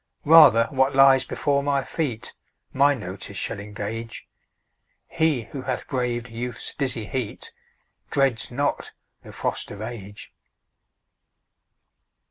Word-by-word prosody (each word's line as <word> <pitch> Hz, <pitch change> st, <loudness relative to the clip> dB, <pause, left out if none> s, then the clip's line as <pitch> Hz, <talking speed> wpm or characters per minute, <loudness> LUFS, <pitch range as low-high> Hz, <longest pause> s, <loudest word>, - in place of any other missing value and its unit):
Rather 150 Hz, -7 st, +8 dB
what 135 Hz, 0 st, +1 dB
lies 135 Hz, -1 st, +6 dB
before 140 Hz, +2 st, 0 dB
my 140 Hz, -1 st, 0 dB
feet 130 Hz, -9 st, -3 dB, 0.4 s
My 140 Hz, +2 st, +4 dB
notice 100 Hz, -2 st, -6 dB
shall 105 Hz, -, -2 dB
engage 105 Hz, +3 st, -6 dB, 0.8 s
He 155 Hz, -7 st, +1 dB
who 135 Hz, -, -5 dB
hath 130 Hz, -1 st, -3 dB
braved 125 Hz, -2 st, -2 dB
Youth's 120 Hz, +1 st, -3 dB
dizzy 130 Hz, -6 st, -1 dB
heat 125 Hz, -2 st, -4 dB, 0.6 s
Dreads 135 Hz, -4 st, +1 dB
not 140 Hz, +4 st, -2 dB, 0.3 s
the -, -, -12 dB
frost -, -, -2 dB
of 100 Hz, -, -9 dB
Age. 105 Hz, -3 st, -8 dB
125 Hz, 110 wpm, -24 LUFS, 115-140 Hz, 0.8 s, Rather